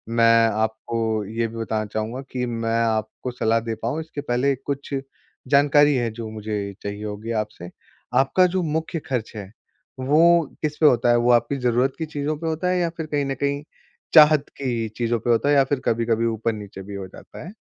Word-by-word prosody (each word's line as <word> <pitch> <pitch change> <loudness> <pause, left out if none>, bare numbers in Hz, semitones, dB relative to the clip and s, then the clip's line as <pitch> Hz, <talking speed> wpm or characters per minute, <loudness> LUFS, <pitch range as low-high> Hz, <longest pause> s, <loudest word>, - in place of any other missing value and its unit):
मैं 115 0 +5
आपको 110 0 -1
ये 115 +3 -2
भी 115 - -11
बताना 110 -1 -2
चाहूँगा 110 +5 -4
कि, 125 -1 -2
मैं 115 -1 -1
आपको 110 +2 -2
सलाह 115 -1 +1
दे 115 0 -4
पाऊँ 120 +7 -2
इसके 155 -2 -7
पहले 135 +1 +1
कुछ 140 +2 -5 0.5
जानकारी 145 +1 +5
है, 120 -2 0
जो 110 0 -7
मुझे 105 -2 -4
चाहिए 100 +1 -5
होगी 105 +2 -5
आपसे। 90 -4 -11 0.5
आपका 160 +7 +4
जो 185 +1 -1
मुख्य 160 +1 -2
ख़र्च 125 -5 -2
है 100 -2 -8 0.5
वो 160 +5 +4 0.2
किस 150 -1 -2
पे 155 - +2
होता 120 -4 +4
है, 120 - +5
वो 120 +1 +3
आपकी 120 +4 +2
ज़रूरत 125 +1 +1
की 160 - -3
चीज़ों 150 0 -3
पे 165 - -5
होता 160 +3 -1
है? 180 - +1
या 170 - +1
फ़िर 165 -1 -6
कहीं 145 -2 -1
न 135 - -2
कहीं 140 +2 -2 0.5
चाहत 150 -2 +7
की 120 -5 -2
चीज़ों 120 -1 0
पे 120 - -4
होता 120 +5 +3
है 145 - +4
या 140 - +6
फ़िर 135 0 -1
कभी-कभी 115 0 +1
ऊपर-नीचे 110 -3 -3
भी 100 +1 -8
हो 95 -1 -6
जाता 95 - -12
है? 185 - -9
120 Hz, 200 wpm, -23 LUFS, 110-145 Hz, 0.5 s, चाहत